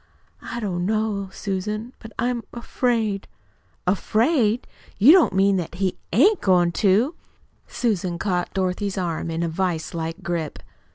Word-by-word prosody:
"I 235 Hz, -, -5 dB
don't 180 Hz, -5 st, -2 dB
know, 215 Hz, -2 st, -1 dB
Susan; 210 Hz, +5 st, -4 dB
but 225 Hz, -, -11 dB
I'm 245 Hz, -1 st, 0 dB
afraid." 230 Hz, -4 st, -1 dB, 0.6 s
"Afraid! 220 Hz, -, +2 dB, 0.3 s
You 230 Hz, +9 st, +8 dB
don't 360 Hz, -2 st, +6 dB
mean 195 Hz, -1 st, +3 dB
he 185 Hz, +1 st, -2 dB
AIN'T 355 Hz, -, +4 dB
goin' 175 Hz, -3 st, +3 dB
to?" 210 Hz, -, +2 dB, 0.5 s
Susan 190 Hz, -7 st, -1 dB
caught 180 Hz, -2 st, -1 dB
Miss -, -, -32 dB
Dorothy's 190 Hz, +1 st, -1 dB
arm 170 Hz, -3 st, -2 dB
in 165 Hz, +1 st, -2 dB
a -, -, 0 dB
vise 165 Hz, -1 st, -2 dB
like 165 Hz, 0 st, -4 dB
grip. 170 Hz, -3 st, -3 dB
195 Hz, 135 wpm, -23 LUFS, 180-225 Hz, 0.6 s, You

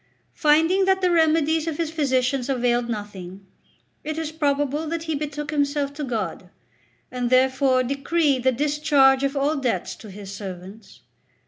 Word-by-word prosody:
Finding 325 Hz, +5 st, +3 dB
that 380 Hz, 0 st, +2 dB
the 365 Hz, -1 st, +2 dB
remedies 320 Hz, -1 st, +2 dB
of 315 Hz, -3 st, -3 dB
his 330 Hz, -2 st, -2 dB
physicians 260 Hz, -4 st, 0 dB
availed 245 Hz, -2 st, 0 dB
nothing, 195 Hz, -3 st, -7 dB, 0.6 s
it 310 Hz, +1 st, -4 dB
is 320 Hz, -1 st, -3 dB
probable 290 Hz, 0 st, -1 dB
that 330 Hz, +1 st, -3 dB
he 320 Hz, -1 st, -3 dB
betook 295 Hz, +1 st, -4 dB
himself 285 Hz, -1 st, 0 dB
to 295 Hz, +1 st, -6 dB
God, 210 Hz, -, -4 dB, 0.6 s
and 250 Hz, -1 st, -2 dB
therefore 260 Hz, 0 st, +3 dB
decreed 275 Hz, +1 st, 0 dB
the 260 Hz, +1 st, +3 dB
discharge 280 Hz, -1 st, +3 dB
of 275 Hz, +1 st, -1 dB
all 290 Hz, +3 st, +1 dB
debts 260 Hz, -4 st, -2 dB
to 215 Hz, -, -12 dB
his 200 Hz, 0 st, -9 dB
servants. 195 Hz, +1 st, -10 dB
280 Hz, 150 wpm, -23 LUFS, 245-310 Hz, 0.6 s, Finding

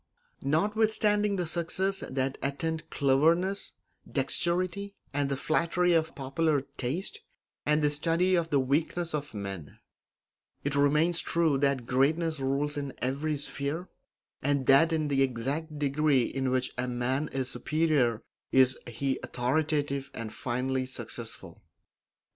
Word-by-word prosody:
Notwithstanding 210 Hz, +5 st, +2 dB
the 180 Hz, -2 st, -1 dB
successes 180 Hz, +4 st, -1 dB
that 130 Hz, 0 st, -1 dB
attend 160 Hz, +3 st, -2 dB
cleverness 165 Hz, +8 st, +2 dB, 0.3 s
and -, -, -19 dB
dexterity 185 Hz, +3 st, 0 dB, 0.2 s
and 140 Hz, -1 st, 0 dB
the 135 Hz, -, -1 dB
flattery 170 Hz, +4 st, +2 dB
of 160 Hz, -1 st, +1 dB
popular 140 Hz, +2 st, 0 dB
taste 145 Hz, +10 st, -3 dB, 0.5 s
and 150 Hz, 0 st, +3 dB
the 150 Hz, -, +4 dB
study 165 Hz, +5 st, +1 dB
of 170 Hz, -2 st, +2 dB
the 145 Hz, -, +3 dB
weaknesses 160 Hz, +5 st, 0 dB
of 145 Hz, -5 st, -4 dB
men, 95 Hz, -7 st, -6 dB, 0.9 s
it 145 Hz, -, -1 dB
remains 150 Hz, +4 st, +3 dB
true 160 Hz, -5 st, +1 dB
that 140 Hz, -3 st, +1 dB
greatness 155 Hz, +5 st, +1 dB
rules 140 Hz, +2 st, 0 dB
in 140 Hz, -2 st, -4 dB
every 145 Hz, +4 st, -1 dB
sphere, 145 Hz, +4 st, -3 dB, 0.5 s
and 140 Hz, -1 st, +1 dB
that 140 Hz, +6 st, +6 dB
in 155 Hz, -2 st, +1 dB
the 140 Hz, -1 st, +1 dB
exact 135 Hz, +5 st, -1 dB
degree 145 Hz, -2 st, +2 dB
in 135 Hz, +2 st, -1 dB
which 130 Hz, 0 st, 0 dB
a 125 Hz, -, 0 dB
man 125 Hz, +4 st, -1 dB
is 130 Hz, -1 st, -1 dB
superior 150 Hz, -8 st, +1 dB, 0.3 s
is 130 Hz, 0 st, +5 dB
he 130 Hz, +3 st, -2 dB
authoritative 140 Hz, +1 st, -1 dB
and 110 Hz, -2 st, -5 dB
finally 130 Hz, +1 st, -1 dB
successful. 130 Hz, -, -7 dB
145 Hz, 130 wpm, -29 LUFS, 135-165 Hz, 0.9 s, that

